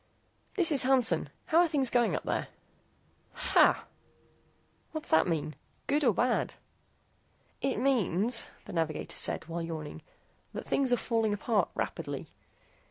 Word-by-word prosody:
"This 350 -4 +1
is 280 - +5
Hansen. 260 -2 +2 0.2
How're 340 +2 +4
things 280 -6 +1
going 240 -2 +2
up - - -3
there?" - - -2 0.9
"Ha!" - - +3 1.1
"What's 315 -1 -5
that 160 +3 +4
mean? 155 -3 -2 0.3
Good 295 +2 +1
or 245 - +5
bad?" 240 +4 0 1.1
"It 270 -4 0
means," 230 -3 +3 0.2
the - - -9
navigator 160 -2 -2
said, - - 0
while 170 +1 -4
yawning, 160 -3 -6 0.5
"that - - -6
things 270 -2 +1
are 245 - +4
falling 225 -3 0
apart 215 +1 0
rapidly. - - -4
235 Hz, 130 wpm, -30 LUFS, 170-270 Hz, 1.1 s, is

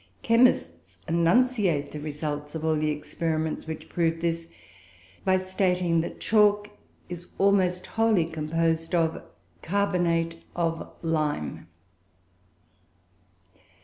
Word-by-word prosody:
Chemists 95 - +2
enunciate 170 - +2
the 150 - -6
result 150 0 -4
of 160 0 -3
all 160 -1 +2
the 155 0 0
experiments 160 +1 -2
which 160 -1 -6
prove 165 -1 0
this, 165 0 -2 0.8
by 190 -1 +3
stating 180 -2 +1
that 165 - -6
chalk 210 -1 +3 0.4
is 175 0 -8
almost 185 -2 +2
wholly 225 -6 +2
composed 165 +1 -1
of 165 -1 +1 0.4
"carbonate 170 -3 0
of 165 -1 -1
lime." 150 - -1
165 Hz, 100 wpm, -26 LUFS, 160-185 Hz, 0.8 s, by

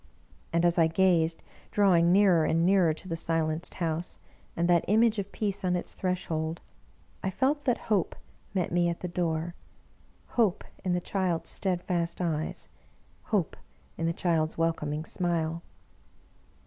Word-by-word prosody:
And 170 +1 +2
as 175 0 +3
I 165 - +6
gazed, 165 -1 +2 0.3
drawing 175 -4 +4
nearer 185 -4 +5
and 165 +2 +2
nearer 185 -3 +4
to 160 +4 -7
the 165 - -2
silenced 165 0 -1
house, 165 0 -3 0.4
and 170 +1 +2
that 175 -1 +4
Image 220 +1 +3
of 200 0 -4
Peace 200 -2 -2
on 180 -1 +1
its 175 - -4
threshold, 165 -3 -2 0.6
I 190 - -1
felt 275 +9 0
that 245 -3 +2
Hope 205 -5 0 0.4
met 180 -2 0
me 175 0 +2
at 170 - -4
the 180 - -3
door 170 -1 -2 0.4
— - - -33
Hope 215 -7 +2 0.2
in 180 - 0
the 175 - 0
child's 175 -4 -1
steadfast 175 -2 -1
eyes, 160 -3 -2 0.6
Hope 200 -7 0 0.4
in 165 - -2
the - - +2
child's 165 -2 0
welcoming 160 -2 -1
smile! 170 -2 -1
175 Hz, 150 wpm, -28 LUFS, 165-190 Hz, 0.6 s, I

